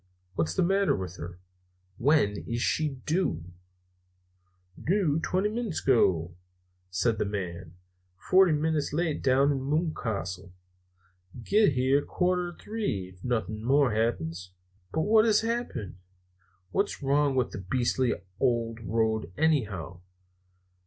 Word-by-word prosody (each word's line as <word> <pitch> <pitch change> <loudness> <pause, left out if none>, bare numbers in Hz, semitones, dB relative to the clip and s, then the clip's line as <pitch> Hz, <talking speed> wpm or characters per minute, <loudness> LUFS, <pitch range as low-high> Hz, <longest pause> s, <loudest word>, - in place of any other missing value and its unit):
What's 85 -2 -1
the - - +3
matter 195 +2 +2
with 90 -2 -6
her? 85 +1 -7 0.6
When 125 -7 +3
is 120 0 -2
she 155 -1 +1 0.2
due?" 160 - 0 1.4
"Doo 170 -5 +2
twenty 190 +3 +1
minits 220 -5 -3
ago," 90 -10 +2 0.5
said 100 +4 0
the - - +1
man. 90 -4 -5 0.4
"Forty 185 - +4
minits 150 -1 0
late 160 -1 0
down 135 +1 +3
to - - +3
Moocastle. 120 - -2 0.9
Git 205 - +4
here 130 +3 +3
quatter 180 -1 0
to - - -16
three, 105 - -3
ef 90 - -20
nothin' 110 -3 -2
more 135 -1 +3
happens." 90 -5 -2 0.4
"But 160 - 0
what 215 +4 +5
has 215 -2 +4
happened? 225 - -3 0.7
What's 200 -6 -1
wrong 140 0 +2
with 130 -2 +1
the - - -6
beastly 120 +5 0 0.2
old 115 -3 0
road, 110 -3 0
anyhow?" 100 - 0
130 Hz, 125 wpm, -28 LUFS, 95-160 Hz, 1.4 s, what